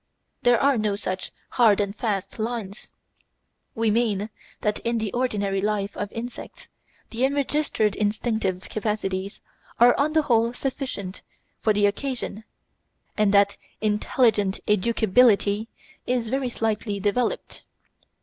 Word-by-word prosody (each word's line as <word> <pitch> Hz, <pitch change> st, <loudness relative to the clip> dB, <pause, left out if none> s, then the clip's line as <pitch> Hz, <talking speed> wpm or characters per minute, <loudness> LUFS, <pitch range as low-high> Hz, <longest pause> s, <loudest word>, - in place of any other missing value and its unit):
There 245 Hz, -2 st, +4 dB
are 275 Hz, -4 st, +3 dB
no 210 Hz, -1 st, 0 dB
such 185 Hz, -2 st, -4 dB, 0.2 s
hard 225 Hz, -5 st, +4 dB
and 200 Hz, 0 st, -1 dB
fast 205 Hz, -3 st, -3 dB
lines. 220 Hz, -3 st, -4 dB, 0.9 s
We 225 Hz, -1 st, +2 dB
mean 215 Hz, -2 st, 0 dB, 0.3 s
that 210 Hz, -1 st, 0 dB
in 235 Hz, 0 st, -1 dB
the 220 Hz, -3 st, -2 dB
ordinary 205 Hz, -6 st, 0 dB
life 205 Hz, -1 st, -1 dB
of 205 Hz, -1 st, -4 dB
insects 240 Hz, +2 st, -8 dB, 0.4 s
the 235 Hz, +2 st, -2 dB
enregistered 280 Hz, -6 st, +1 dB
instinctive 210 Hz, -3 st, -1 dB
capacities 200 Hz, -3 st, -3 dB, 0.4 s
are 240 Hz, +1 st, +7 dB
on 300 Hz, +2 st, +2 dB
the 315 Hz, -1 st, +3 dB
whole 235 Hz, -3 st, +2 dB
sufficient 250 Hz, -8 st, -4 dB, 0.4 s
for 220 Hz, -, +2 dB
the 205 Hz, 0 st, +3 dB
occasion, 220 Hz, 0 st, -2 dB, 0.7 s
and 210 Hz, -2 st, +3 dB
that 200 Hz, 0 st, +4 dB, 0.2 s
intelligent 210 Hz, -1 st, +1 dB
educability 210 Hz, 0 st, +3 dB, 0.4 s
is 245 Hz, -3 st, 0 dB
very 265 Hz, 0 st, 0 dB
slightly 215 Hz, -3 st, -2 dB
developed. 210 Hz, +5 st, -1 dB
215 Hz, 120 wpm, -24 LUFS, 200-240 Hz, 0.9 s, are